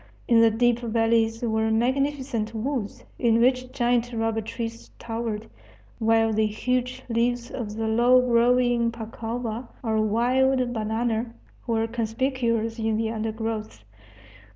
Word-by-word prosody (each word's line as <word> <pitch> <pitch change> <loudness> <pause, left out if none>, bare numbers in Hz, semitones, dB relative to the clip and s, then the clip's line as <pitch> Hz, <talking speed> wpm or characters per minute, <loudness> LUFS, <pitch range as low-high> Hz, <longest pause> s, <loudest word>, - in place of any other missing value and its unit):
In 230 - +5
the 230 - +6
deep 240 +2 +2
valleys 225 0 +1
were 220 -1 +1
magnificent 255 -1 0
woods, 230 -2 -3 0.2
in 230 -1 +3
which 255 +1 +2
giant 240 0 +1
rubber 225 -1 -1
trees 230 +1 -6
towered, 225 -2 -4 0.5
while 225 0 +3
the 215 0 +2
huge 250 +4 -2
leaves 240 0 0
of 215 -4 -5
the 225 0 -2
low 240 +3 +5
growing 245 -1 +3
pacova, 230 +1 -5 0.2
or 220 -2 +1
wild 250 +3 +2
banana, 225 +1 -2 0.3
were 225 -1 +1
conspicuous 230 0 -1
in 220 -1 0
the 220 0 -1
undergrowth. 220 - -4
230 Hz, 125 wpm, -25 LUFS, 225-245 Hz, 0.5 s, the